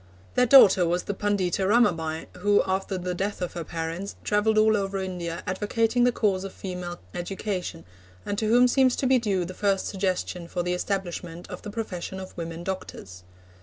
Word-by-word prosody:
Their 250 Hz, -, +3 dB
daughter 215 Hz, -8 st, +8 dB
was 175 Hz, +1 st, 0 dB
the 200 Hz, -, -3 dB
Pundita 195 Hz, -2 st, 0 dB
Ramabai, 165 Hz, -8 st, +2 dB
who, 205 Hz, +2 st, +4 dB
after 190 Hz, 0 st, -1 dB
the 180 Hz, 0 st, -3 dB
death 195 Hz, +3 st, -3 dB
of 180 Hz, -1 st, -3 dB
her 170 Hz, -, -4 dB
parents, 165 Hz, +4 st, -5 dB
travelled 215 Hz, +1 st, +2 dB
all 215 Hz, 0 st, +5 dB
over 195 Hz, -1 st, -1 dB
India 180 Hz, -3 st, -4 dB
advocating 225 Hz, +5 st, +1 dB
the 245 Hz, -, +4 dB
cause 195 Hz, -5 st, 0 dB
of 195 Hz, -, -6 dB
female 180 Hz, -2 st, -6 dB, 0.2 s
education, 180 Hz, -, -4 dB, 0.4 s
and 205 Hz, -, -2 dB
to 220 Hz, -, 0 dB
whom 245 Hz, +3 st, +6 dB
seems 255 Hz, 0 st, +3 dB
to -, -, -2 dB
be 260 Hz, 0 st, +4 dB
due 195 Hz, -6 st, 0 dB
the 185 Hz, -, -7 dB
first 195 Hz, 0 st, 0 dB
suggestion 185 Hz, -2 st, -2 dB
for 175 Hz, 0 st, -2 dB
the 180 Hz, 0 st, -1 dB
establishment 180 Hz, -2 st, -3 dB
of 180 Hz, -, -7 dB
the -, -, -7 dB
profession 190 Hz, -4 st, -5 dB
of 190 Hz, 0 st, -9 dB
women 165 Hz, 0 st, -6 dB
doctors. 95 Hz, -, -6 dB
190 Hz, 185 wpm, -26 LUFS, 175-210 Hz, 0.4 s, daughter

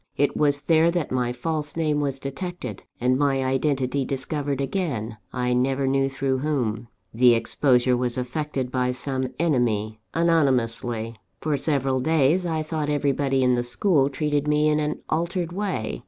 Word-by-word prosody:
It 145 Hz, -, +1 dB
was 145 Hz, -1 st, +2 dB
there 160 Hz, +3 st, +4 dB
that 170 Hz, -4 st, -1 dB
my 125 Hz, -1 st, 0 dB
false 150 Hz, +4 st, -3 dB
name 155 Hz, -3 st, +1 dB
was 140 Hz, -2 st, 0 dB
detected, 135 Hz, -, -6 dB
and 125 Hz, +2 st, +2 dB
my 135 Hz, -2 st, +2 dB
identity 135 Hz, 0 st, 0 dB
discovered 140 Hz, +1 st, -3 dB
again 135 Hz, -, -2 dB
I 125 Hz, 0 st, 0 dB
never 135 Hz, +2 st, +1 dB
knew 135 Hz, 0 st, +2 dB
through 135 Hz, -1 st, -1 dB
whom. 120 Hz, -6 st, -1 dB, 0.3 s
The 120 Hz, +1 st, +5 dB
exposure 125 Hz, +2 st, +2 dB
was 125 Hz, -1 st, -1 dB
effected 130 Hz, 0 st, -3 dB
by 125 Hz, -1 st, 0 dB
some 130 Hz, 0 st, -2 dB
enemy, 115 Hz, -9 st, 0 dB, 0.2 s
anonymously. 120 Hz, -8 st, +1 dB, 0.2 s
For 155 Hz, -2 st, 0 dB
several 135 Hz, -2 st, 0 dB
days, 160 Hz, +5 st, +2 dB
I 160 Hz, -2 st, -1 dB
thought 155 Hz, -1 st, -3 dB
everybody 140 Hz, -2 st, +1 dB
in 125 Hz, 0 st, +4 dB
the 120 Hz, -, +1 dB
school 135 Hz, +4 st, +2 dB
treated 145 Hz, +1 st, -1 dB
me 150 Hz, 0 st, +3 dB
in 150 Hz, 0 st, +2 dB
an 150 Hz, 0 st, -2 dB
altered 170 Hz, +1 st, -1 dB
way. 180 Hz, -, -3 dB
135 Hz, 155 wpm, -24 LUFS, 125-150 Hz, 0.3 s, The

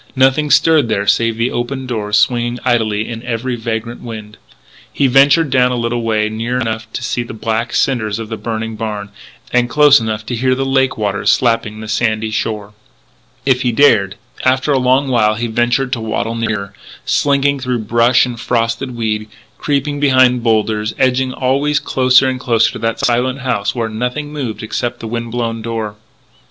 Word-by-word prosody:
Nothing 135 Hz, +3 st, +3 dB
stirred 150 Hz, -2 st, +4 dB
there 100 Hz, -2 st, 0 dB
save 115 Hz, +3 st, +2 dB
the 115 Hz, +2 st, 0 dB
open 130 Hz, +2 st, -3 dB
doors 105 Hz, -4 st, -1 dB
swinging 120 Hz, +3 st, +1 dB
idly 110 Hz, -4 st, +1 dB
in 115 Hz, -1 st, -6 dB
every 120 Hz, +1 st, -3 dB
vagrant 115 Hz, 0 st, -4 dB
wind. 110 Hz, -2 st, -9 dB, 0.5 s
He 140 Hz, -, 0 dB
ventured 140 Hz, +3 st, +4 dB
down 125 Hz, -1 st, +3 dB
a -, -, -1 dB
little 120 Hz, 0 st, -1 dB
way 110 Hz, -2 st, 0 dB
near 115 Hz, +3 st, -3 dB
enough 110 Hz, -2 st, -3 dB
to -, -, -4 dB
see 120 Hz, -, -1 dB
the 120 Hz, -1 st, -7 dB
black 115 Hz, +2 st, -2 dB
cinders 110 Hz, -6 st, 0 dB
of 115 Hz, -1 st, -6 dB
the 110 Hz, -, -4 dB
burned 110 Hz, -1 st, -5 dB
barn, 105 Hz, -2 st, -4 dB, 0.4 s
and 125 Hz, 0 st, +2 dB
close 145 Hz, -1 st, +6 dB
enough 110 Hz, -1 st, -3 dB
to 120 Hz, -, -3 dB
hear 130 Hz, +2 st, +1 dB
the 135 Hz, +1 st, -2 dB
lake 135 Hz, 0 st, +1 dB
waters 100 Hz, -2 st, +1 dB
slapping 115 Hz, -3 st, 0 dB
the 110 Hz, -, -7 dB
sandy 110 Hz, 0 st, 0 dB
shore. 110 Hz, -2 st, -3 dB, 0.7 s
If 130 Hz, -2 st, +2 dB
he 125 Hz, -2 st, +1 dB
dared 105 Hz, -7 st, +3 dB, 0.3 s
And 130 Hz, -, +5 dB
after 130 Hz, +3 st, -2 dB
a 135 Hz, -, +3 dB
long 130 Hz, +2 st, +2 dB
while 110 Hz, -4 st, +2 dB
he 115 Hz, +2 st, -2 dB
ventured 120 Hz, +3 st, 0 dB
to 115 Hz, -, -2 dB
waddle 110 Hz, +1 st, -2 dB
nearer, 110 Hz, -3 st, -3 dB, 0.3 s
slinking 140 Hz, 0 st, +1 dB
through 125 Hz, -3 st, -2 dB
brush 120 Hz, +3 st, +3 dB
and 120 Hz, -2 st, -6 dB
frosted 120 Hz, +2 st, -1 dB
weed, 110 Hz, -2 st, -2 dB, 0.3 s
creeping 145 Hz, 0 st, -1 dB
behind 130 Hz, -3 st, +4 dB
boulders, 110 Hz, -1 st, 0 dB
edging 130 Hz, 0 st, +1 dB
always 140 Hz, +3 st, 0 dB
closer 130 Hz, 0 st, +3 dB
and 130 Hz, -1 st, -2 dB
closer 115 Hz, -3 st, +2 dB
to -, -, -8 dB
that 115 Hz, 0 st, -1 dB
silent 125 Hz, +2 st, 0 dB
house 125 Hz, -5 st, -1 dB
where 115 Hz, -2 st, -1 dB
nothing 125 Hz, +7 st, -4 dB
moved 125 Hz, -8 st, -4 dB
except 120 Hz, +2 st, -3 dB
the 115 Hz, -, -6 dB
wind 115 Hz, +1 st, -4 dB
blown 115 Hz, -1 st, -2 dB
door. 110 Hz, -2 st, -4 dB
120 Hz, 185 wpm, -16 LUFS, 110-130 Hz, 0.7 s, close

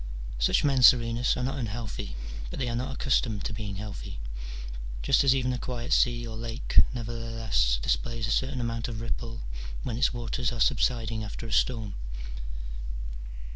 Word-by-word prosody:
Such -, -, +4 dB
men, 135 Hz, -3 st, +3 dB
Serenus, 120 Hz, -1 st, +6 dB
are -, -, -1 dB
not 135 Hz, +2 st, -1 dB
unhealthy, 110 Hz, -, -4 dB, 0.3 s
but -, -, -6 dB
they 130 Hz, -, 0 dB
are 115 Hz, -, -1 dB
not 130 Hz, +3 st, -1 dB
accustomed 120 Hz, -5 st, +1 dB
to -, -, -2 dB
being 105 Hz, -2 st, -4 dB
healthy; 100 Hz, -, -6 dB, 0.8 s
just 135 Hz, -, +5 dB
as 135 Hz, -1 st, +5 dB
even 130 Hz, -1 st, +1 dB
a 125 Hz, -, -2 dB
quiet 125 Hz, -1 st, -2 dB
sea 120 Hz, -1 st, +3 dB
or 115 Hz, -1 st, -5 dB
lake 115 Hz, +1 st, +2 dB
nevertheless 115 Hz, -, 0 dB
displays 115 Hz, -, 0 dB
a 115 Hz, -, -1 dB
certain 130 Hz, +1 st, +1 dB
amount 115 Hz, -1 st, -1 dB
of 115 Hz, -3 st, -4 dB
ripple 115 Hz, 0 st, -4 dB, 0.4 s
when 115 Hz, -1 st, -2 dB
its 135 Hz, -, +4 dB
waters 120 Hz, 0 st, -1 dB
are 120 Hz, -, -5 dB
subsiding 115 Hz, -3 st, +2 dB
after 105 Hz, +2 st, -6 dB
a 115 Hz, -, -6 dB
storm. 110 Hz, -5 st, +2 dB
115 Hz, 165 wpm, -29 LUFS, 110-125 Hz, 0.8 s, Serenus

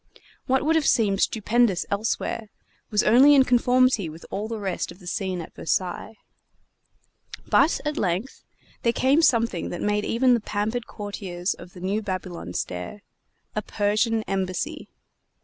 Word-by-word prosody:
What 265 Hz, +2 st, +2 dB
would 320 Hz, +1 st, +3 dB
have 320 Hz, -3 st, +2 dB
seemed 200 Hz, -4 st, +2 dB
stupendous 220 Hz, -3 st, +2 dB
elsewhere 215 Hz, +1 st, -2 dB, 0.4 s
was 210 Hz, -1 st, +2 dB
only 270 Hz, +6 st, +7 dB
in 270 Hz, -, +7 dB
conformity 250 Hz, -5 st, +3 dB
with 160 Hz, +2 st, -11 dB
all 205 Hz, +2 st, -3 dB
the 225 Hz, 0 st, -4 dB
rest 190 Hz, -3 st, -3 dB
of -, -, -13 dB
the 185 Hz, -, -16 dB
scene 185 Hz, 0 st, -2 dB
at 160 Hz, -, -10 dB
Versailles. 185 Hz, +5 st, -2 dB, 1.3 s
But, 325 Hz, -, +3 dB
at 300 Hz, 0 st, -2 dB
length, 190 Hz, +7 st, -2 dB, 0.4 s
there 235 Hz, -, +2 dB
came 275 Hz, +6 st, +3 dB
something 230 Hz, -, +2 dB
that 175 Hz, -, -5 dB
made 210 Hz, 0 st, 0 dB
even 250 Hz, +3 st, +3 dB
the 240 Hz, -, +3 dB
pampered 215 Hz, +3 st, -3 dB
courtiers 195 Hz, -3 st, -4 dB
of 180 Hz, -, -13 dB
the 180 Hz, -, -12 dB
new 200 Hz, +4 st, -1 dB
Babylon 185 Hz, -, -5 dB
stare 90 Hz, -, -5 dB, 0.5 s
a 215 Hz, -, 0 dB
Persian 215 Hz, +2 st, 0 dB
embassy. 195 Hz, -, -3 dB
210 Hz, 150 wpm, -24 LUFS, 185-240 Hz, 1.3 s, only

